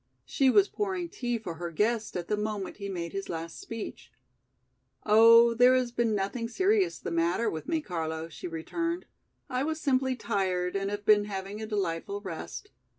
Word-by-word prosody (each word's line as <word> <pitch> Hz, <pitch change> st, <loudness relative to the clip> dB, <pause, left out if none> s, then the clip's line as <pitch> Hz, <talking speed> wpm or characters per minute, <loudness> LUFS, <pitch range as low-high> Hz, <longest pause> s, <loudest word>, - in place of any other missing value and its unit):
She 270 Hz, -2 st, +2 dB
was 400 Hz, +8 st, +5 dB
pouring 375 Hz, -5 st, -3 dB
tea 240 Hz, -5 st, -2 dB
for 180 Hz, -7 st, -7 dB
her 175 Hz, +1 st, -4 dB
guest 215 Hz, +4 st, 0 dB
at 175 Hz, -1 st, -5 dB
the 210 Hz, -, +1 dB
moment 210 Hz, -2 st, -3 dB
he 200 Hz, -1 st, -5 dB
made 170 Hz, -3 st, -4 dB
his 195 Hz, 0 st, -4 dB
last 165 Hz, -1 st, -5 dB
speech. 170 Hz, -, -7 dB, 0.9 s
"Oh, 230 Hz, +2 st, +7 dB
there 250 Hz, +2 st, +6 dB
has 250 Hz, -2 st, +1 dB
been 235 Hz, -2 st, +1 dB
nothing 220 Hz, +4 st, -2 dB
serious 380 Hz, -, +2 dB
the -, -, -6 dB
matter 170 Hz, +7 st, +1 dB
with 155 Hz, -, -6 dB
me, 325 Hz, -1 st, 0 dB
Carlo," 160 Hz, -, -4 dB
she 165 Hz, -, -8 dB
returned. 335 Hz, -, -3 dB, 0.4 s
"I 255 Hz, -2 st, -1 dB
was 315 Hz, +1 st, -2 dB
simply 260 Hz, -3 st, +1 dB
tired 190 Hz, -6 st, -1 dB
and 195 Hz, 0 st, -1 dB
have 205 Hz, 0 st, -5 dB
been 210 Hz, -1 st, +5 dB
having 200 Hz, +1 st, -5 dB
a 220 Hz, -, -4 dB
delightful 200 Hz, -2 st, -2 dB
rest. 195 Hz, -, -7 dB
210 Hz, 180 wpm, -29 LUFS, 180-250 Hz, 0.9 s, Oh